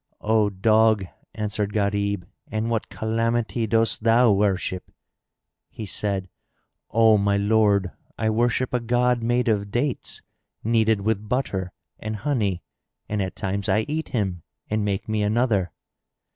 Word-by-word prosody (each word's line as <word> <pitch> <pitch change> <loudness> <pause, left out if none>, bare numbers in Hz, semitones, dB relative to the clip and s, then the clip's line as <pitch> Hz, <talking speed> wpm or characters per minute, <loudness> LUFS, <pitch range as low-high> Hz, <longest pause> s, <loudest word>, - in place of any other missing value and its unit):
"O 110 -1 +2
dog," 110 +1 +3 0.3
answered 105 -2 -2
Gharib, 100 -2 0 0.3
"and 110 +2 -1
what 115 -2 -1
calamity 115 +1 -1
dost 115 +1 +2
thou 115 +1 +5
worship?" 95 -2 0 0.8
He 110 - -7
said, 100 -1 -2 0.6
"O 110 -1 +5
my 100 0 +2
lord, 100 -2 +2 0.3
I 110 0 +1
worship 120 +3 +1
a 125 - +2
god 120 +1 +1
made 120 +1 +1
of 105 -3 +1
dates[FN#11] 120 +5 -2 0.4
kneaded 110 -2 +2
with 105 0 -1
butter 100 -8 -1 0.3
and 110 0 -4
honey, 105 - -1 0.4
and 105 -1 -1
at 95 -1 -3
times 100 +1 -2
I 110 - +3
eat 160 +2 -3
him 95 -7 -2 0.3
and 110 0 +1
make 100 -2 -2
me 110 -1 0
another." 105 -3 +1
110 Hz, 135 wpm, -24 LUFS, 100-115 Hz, 0.8 s, thou